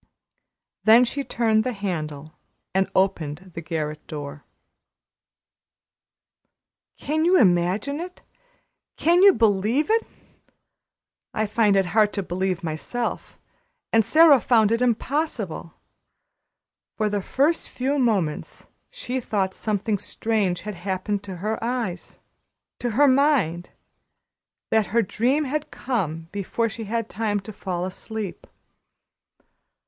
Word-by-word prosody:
Then 230 +3 +7
she 280 +4 -3
turned 220 -4 +1
the 255 - -2
handle 155 -7 -4 0.4
and 190 0 +1
opened 185 -2 0
the 165 - -6
garret 155 -2 -4
door. 145 -1 -7 2.5
Can 310 +2 -1
you 360 +3 +5
imagine 190 - +2
it 360 +2 -8 0.7
can 345 +3 +4
you 400 0 +9
believe 225 - +2
it? 455 +1 +2 1.3
I 215 - +1
find 210 -1 +2
it 195 -1 +3
hard 215 -1 +4
to 200 - -2
believe 185 +1 -1
it - - -23
myself. 170 +10 -4 0.6
And 225 0 +5
Sara 295 +3 +6
found 220 -3 +3
it 230 +1 +1
impossible; 240 - -1 1.2
for 215 - +1
the 205 -1 -1
first 290 - 0
few 275 +3 -1
moments 200 - -1 0.2
she 260 - -4
thought 195 -5 -1
something 210 0 -1
strange 205 -6 -1
had 210 +1 -5
happened 190 +2 -3
to 190 -2 -6
her 220 +1 -2
eyes 230 -7 -3 0.6
to 245 - -1
her 290 0 +6
mind 260 - +2 1.0
that 220 -3 +2
the 235 0 +4
dream 250 +9 +1
had 300 +2 -3
come 165 - -3
before 205 +3 -1
she 220 0 -7
had 220 +3 -4
had 230 -2 -1
time 210 -2 -1
to 215 +2 -9
fall 180 -2 -3
asleep. 205 +1 -6
215 Hz, 125 wpm, -24 LUFS, 185-250 Hz, 2.5 s, you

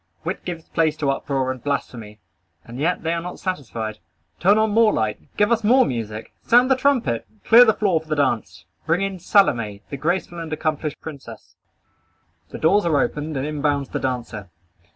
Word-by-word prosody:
Wit - - -4
gives 170 -3 -6
place 160 -2 0
to 140 -3 +1
uproar 135 -1 -1
and 130 -2 -8
blasphemy. 115 -7 -4 0.5
And 120 +2 -9
yet 170 +4 0
they 165 +1 0
are 170 - -2
not 180 +1 -7
satisfied. 115 - -4 0.4
Turn 200 +4 +4
on 220 0 +2
more 220 0 +4
light. 110 - -1 0.2
Give 210 +2 +3
us 230 -1 +2
more 255 +4 +5
music. 110 -2 -5
Sound 245 +3 +4
the - - +6
trumpet. 255 - 0 0.2
Clear 240 +2 +8
the 220 - +4
floor 185 -7 +1
for 160 - -19
the 155 - -1
dance. 145 -2 -1 0.2
Bring 170 +4 +2
in 195 -1 -3
Salome, 115 - +2
the 140 - -4
graceful 175 +3 -2
and 165 -1 -6
accomplished 155 -1 -2
princess. 150 -4 -10 0.9
The - - -7
doors 200 +6 +3
are 150 -4 +2
opened 150 +1 -2
and 135 - -2
in 150 -1 -4
bounds 140 -2 0
the - - -3
dancer. 120 -6 -4
155 Hz, 190 wpm, -22 LUFS, 130-195 Hz, 0.9 s, Clear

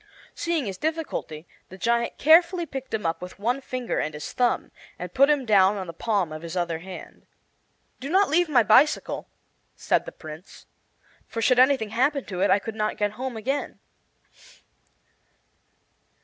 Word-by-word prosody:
Seeing 335 -5 -1
his 195 -2 -5
difficulty 310 - -3 0.2
the 190 - -11
giant 235 +3 0
carefully 340 +3 +5
picked 270 -3 -7
him 220 -4 -2
up 165 0 -1
with 180 0 -9
one 240 +7 -1
finger 255 -2 -3
and 155 0 -3
his 150 - -7
thumb, 245 -1 0 0.3
and 180 0 -7
put 275 +2 +5
him 290 -3 +2
down 200 -2 +4
on 190 - -4
the 170 - -8
palm 195 -2 -1
of 155 0 -7
his 170 +2 -6
other 170 -2 -1
hand. 185 +2 -11 0.7
"Do 275 - -6
not 390 +4 +4
leave 335 +2 +2
my 250 -6 +5
bicycle," 245 +8 +3 0.5
said - - 0
the - - -5
Prince, 155 +2 -12 0.6
"for 230 - -5
should 245 +3 +3
anything 260 -4 +4
happen 265 +4 +1
to 185 -3 -5
it 200 - +3
I - - +5
could 220 +2 -6
not 215 0 -2
get 205 -1 0
home 250 +2 -5
again." 270 +6 -3
230 Hz, 170 wpm, -25 LUFS, 185-275 Hz, 0.7 s, carefully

